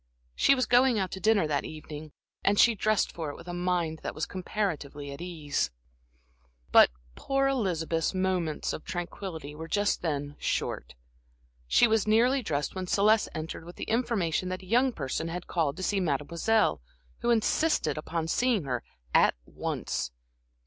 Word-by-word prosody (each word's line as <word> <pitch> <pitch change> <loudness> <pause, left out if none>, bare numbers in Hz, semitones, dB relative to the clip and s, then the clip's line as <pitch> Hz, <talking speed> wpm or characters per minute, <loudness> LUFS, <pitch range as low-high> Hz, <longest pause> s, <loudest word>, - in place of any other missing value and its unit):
She 275 - +4
was 255 - +1
going 245 -1 +4
out 190 -2 -1
to 190 - -5
dinner 215 -3 +3
that 145 -2 0
evening, 155 -1 -8 0.3
and 205 +1 +3
she 235 - +6
dressed 215 0 +1
for 160 -3 -4
it 145 - -6
with 170 - -12
a 175 - -4
mind 175 -3 -1
that - - -5
was 155 - -1
comparatively 160 -7 -3
at 140 - -8
ease. 160 - -2 1.0
But - - +8 0.2
poor 275 - 0
Elizabeth's 170 -11 0
moments 185 -4 -1
of - - -6
tranquillity 175 -4 -5
just 205 +3 +1
then 145 -4 -2
were 145 - -15
short. - - -2 0.7
She 240 - +5
was 220 -2 +2
nearly 245 +5 +4
dressed 150 - -2
when 185 -1 -4
Celeste 210 +3 +3
entered 160 0 -5
with 175 +2 -11
the - - -6
information 200 -7 0
that 185 +1 -4
a - - -11
young 245 +7 +3
person 150 - -3
had 175 +1 -5
called 160 -3 -1
to 185 - -5
see 200 +1 +1
Mademoiselle, 165 - +1 0.4
who 240 - -1
insisted 235 - +2
upon 160 +1 -3
seeing 235 +1 +2
her 125 -3 -2 0.3
at - - +5
once. - - -3
180 Hz, 165 wpm, -28 LUFS, 155-215 Hz, 1.0 s, But